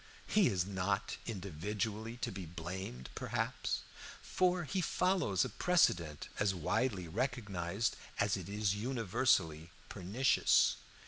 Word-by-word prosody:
He 205 -4 +4
is 90 -3 +1
not 100 +1 -1
individually 105 +3 -3
to - - -1
be 95 -3 -6
blamed, 85 -6 -6
perhaps, - - -2 0.4
for 180 -1 +1
he 170 +5 -1
follows 180 - +2
a - - -1
precedent 85 - +2
as 100 -2 +2
widely 100 +2 0
recognized 100 -1 -1 0.2
as 100 -1 +3
it 95 -2 -6
is 105 -1 +1
universally 100 - +1 0.2
pernicious. 115 +9 +3
100 Hz, 115 wpm, -35 LUFS, 90-120 Hz, 0.4 s, He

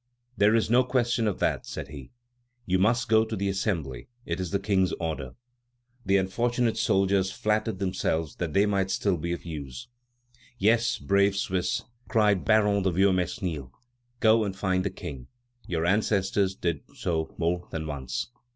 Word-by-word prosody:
"There 105 0 +4
is 115 - +2
no 120 +4 +4
question 120 -2 +1
of 100 - -1
that," - - 0
said - - -6
he; 70 -3 -9 0.6
"you 95 -1 +1
must 115 +5 +2
go 110 0 +5
to 110 0 -4
the 100 0 -1
Assembly; 85 - -2 0.2
it 85 +2 -3
is 90 -2 -2
the 100 - +1
King's 95 -2 +1
order." 75 -6 -4 0.7
The 95 0 +3
unfortunate 120 +5 0
soldiers 95 0 +2
flattered 110 +1 0
themselves 85 -5 -1
that 85 -4 -3
they 100 +4 +4
might 100 -2 0
still 95 0 +1
be 85 +1 -3
of 85 - -4
use. 80 - -7 0.7
"Yes, 115 +3 +3
brave 100 0 +2
Swiss," 95 -2 -1 0.2
cried 105 -5 +3
Baron 105 -2 +4
de 95 - +2
Viomesnil, 90 -6 0 0.5
"go 110 -1 +5
and 100 -2 -3
find 95 -1 0
the 100 - 0
King. 70 -8 -8 0.4
Your 85 -2 -1
ancestors 95 0 +1
did 85 -6 -2
so 80 -2 -2
more 90 +1 -1
than 80 -1 -4
once." 70 - -4
95 Hz, 160 wpm, -27 LUFS, 85-105 Hz, 0.7 s, go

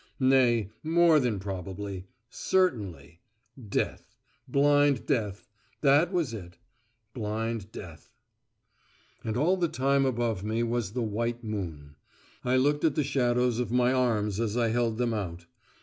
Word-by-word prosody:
Nay, 125 -6 +3
more 165 0 +4
than 120 -6 0
probably. 95 0 -6 0.2
Certainly. 105 - -1 0.5
Death. - - -2 0.3
Blind 145 0 +3
death. 105 -8 -1 0.4
That 145 +5 +4
was 165 -10 0
it. 90 -5 -9 0.6
Blind 110 -2 -3
death. 85 -7 -10 1.1
And 110 0 -2
all 175 +8 +3
the 175 -2 +1
time 135 -1 +1
above 115 -6 -1
me 110 +2 0
was 115 -3 -2
the 125 -1 -1
white 115 +2 -2
moon. 80 -9 -6 0.5
I 125 +1 +1
looked 145 +3 +2
at 160 -4 +2
the 150 - +2
shadows 125 -3 +1
of 125 -4 -1
my 125 +1 +3
arms 110 -5 +1
as 115 0 -1
I 115 -2 +2
held 115 -1 0
them 120 -1 0
out. 85 -5 -4
120 Hz, 135 wpm, -28 LUFS, 105-135 Hz, 1.1 s, more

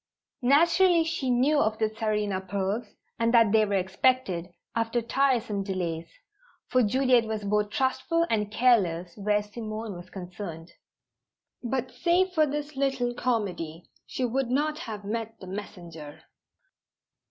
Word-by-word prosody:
Naturally 335 +6 +5
she 315 -5 -2
knew 265 +5 +3
of 215 -4 +1
the 220 - +2
Tsarina 210 -3 -1
pearls, 200 +4 -1 0.3
and 230 0 +2
that 230 -3 +6
they 215 -1 +4
were 200 - 0
expected, 190 -1 +1 0.3
after 230 +1 +1
tiresome 235 -4 +1
delays; 175 -4 -3 0.6
for 255 - +3
Juliet 250 +1 +3
was 220 -1 -3
both 210 +1 +1
trustful 260 +8 +1
and 210 -5 0
careless 185 -8 +2
where 210 0 +1
Simone 215 0 -6
was 175 +1 -10
concerned. 175 -3 -8 0.9
But, 255 +1 -2
save 360 +2 +2
for 310 -3 +3
this 295 +1 -4
little 270 -3 0
comedy, 180 -10 -2 0.2
she 255 - -2
would 250 +1 -1
not 300 +4 0
have 210 -3 -6
met 225 +1 -4
the - - -9
messenger. 175 -6 -8
225 Hz, 135 wpm, -27 LUFS, 200-260 Hz, 0.9 s, that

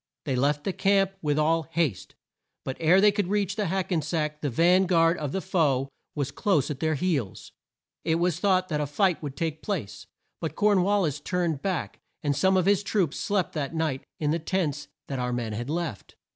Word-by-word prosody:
They 135 -4 0
left 145 +3 +1
the 195 - -1
camp 195 0 +2
with 150 -2 0
all 160 +2 +3
haste, 160 - -1 0.5
but 130 - -3
ere 170 +4 +5
they 205 +1 +6
could 205 -2 -1
reach 200 -1 0
the 210 -3 -1
Hack 190 +2 -2
en 165 -3 +2
sack 150 0 -2
the 145 - -1
van 175 +8 +4
guard 165 -1 +3
of 150 -3 -3
the 190 - -2
foe 145 -9 +1 0.3
was 140 -2 -2
close 150 -2 +1
at 140 - -5
their 155 -1 +1
heels. 140 - -2 0.5
It 160 - +1
was 170 -1 0
thought 185 -2 +2
that 150 -2 0
a 145 - -1
fight 180 +4 +1
would 145 -3 -6
take 160 -1 -2
place, 160 - -4 0.3
but - - -4
Corn 205 -2 +3
wal 200 +2 +2
lis 150 -3 -1
turned 170 -3 -1
back 190 -4 -3 0.2
and 145 -2 +1
some 190 +6 +3
of 185 - +2
his 200 0 +3
troops 190 -6 0
slept 200 -5 0
that 150 0 -3
night 155 -5 -1 0.2
in 150 -1 +1
the 165 - 0
tents 155 -4 -2 0.2
that 135 -2 -3
our 125 0 -1
men 120 -3 -2
had 120 +5 -4
left. 160 - -4
165 Hz, 215 wpm, -26 LUFS, 145-185 Hz, 0.5 s, they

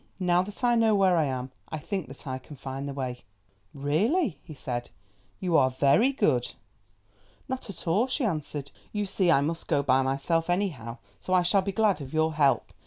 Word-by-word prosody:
Now 180 -1 +3
that 205 +6 -6
I 240 -1 +4
know 225 -2 +4
where 190 -2 +4
I 160 -3 +3
am 130 -1 -3 0.2
I 155 - -4
think 190 +2 -4
that 135 - -9
I 130 -1 -4
can 145 +3 -12
find 135 +1 -6
the - - -4
way." 125 -3 -4 0.5
"Really," 185 - 0
he 155 - -11
said, 120 -3 -4 0.5
"you 180 -3 0
are 130 -4 +5
very 140 - +3
good." 275 - +1 0.9
"Not 260 -4 -5
at 195 - -9
all," 205 +10 +3
she 260 0 0
answered, 150 -6 -3 0.2
"you 210 -1 -1
see 190 -2 +1
I 140 -5 +5
must 165 +3 -3
go 140 -1 +1
myself 135 +6 +1
anyhow, 155 - -1 0.2
so 185 - -3
I 180 - +4
shall 195 +3 +3
be 195 +1 -2
glad 200 -4 +2
of 135 +2 -7
your 160 0 +2
help. 145 -3 +2
160 Hz, 195 wpm, -27 LUFS, 135-195 Hz, 0.9 s, are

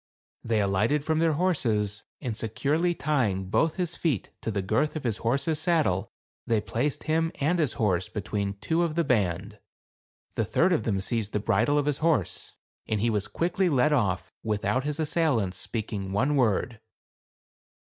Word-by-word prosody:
They 110 -2 +1
alighted 110 +9 +1
from 160 0 +1
their 165 -1 +3
horses, 115 - 0 0.2
and 120 -6 -3
securely 145 +10 0
tying 105 - 0
both 160 -1 +2
his 175 -3 -2
feet 145 - -1
to - - -3
the 100 -3 -1
girth 115 +12 +1
of 155 - -4
his 115 -4 0
horse's 140 +6 0
sad 165 0 +3
dle 95 -3 -1 0.4
they 115 -2 +3
placed 115 +8 -2
him 160 +1 +1
and 160 +5 +1
his 145 -8 +1
horse 95 -5 0
between 100 -1 -3
two 160 +11 0
of 165 -3 0
the 170 - +2
band, 105 - 0 0.7
the - - 0
third 185 +3 +2
then 110 - +1
seized 110 0 -2
the 105 - +1
bridle 115 +8 +2
of 145 - +2
his 145 -2 0
horse; 155 - 0 0.3
and 110 - 0
he 115 +3 +1
was 105 -2 -1
led 105 - -26
quickly 180 +2 +1
off, 125 - +2
without 105 +4 0
his 150 +1 -2
assailants 145 - +1
speaking 105 -4 -4
one 130 +9 +1
word. 115 -2 +1
120 Hz, 170 wpm, -27 LUFS, 105-155 Hz, 0.7 s, their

